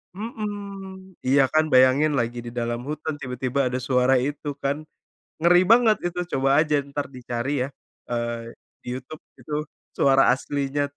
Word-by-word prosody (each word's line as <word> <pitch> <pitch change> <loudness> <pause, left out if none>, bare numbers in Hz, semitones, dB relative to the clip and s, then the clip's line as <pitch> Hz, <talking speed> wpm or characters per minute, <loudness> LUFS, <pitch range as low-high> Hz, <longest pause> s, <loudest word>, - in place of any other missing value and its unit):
Mhm. 200 -3 -7
Iya 140 +2 +5
kan 155 0 +4
bayangin 130 +4 +5
lagi 120 +1 -2
di 120 - -6
dalam 120 0 -2
hutan 155 0 -3
tiba-tiba 125 +1 -3
ada 130 - -1
suara 130 0 +3
itu 145 +3 -3 0.2
kan, 140 +2 -1 0.6
ngeri 175 +2 +6
banget, 230 -2 +5
itu. 175 0 -4 0.2
Coba 135 0 +1 0.2
aja 150 -1 -1
entar 140 +1 -5
dicari 120 0 -4
ya, 130 - -2 0.4
eee, 120 -1 -3 0.3
di - - -24
YouTube 130 +4 -9 0.2
itu 150 - -10 0.4
suara 135 -1 +5
aslinya 140 +2 -2
140 Hz, 150 wpm, -24 LUFS, 125-165 Hz, 0.6 s, ngeri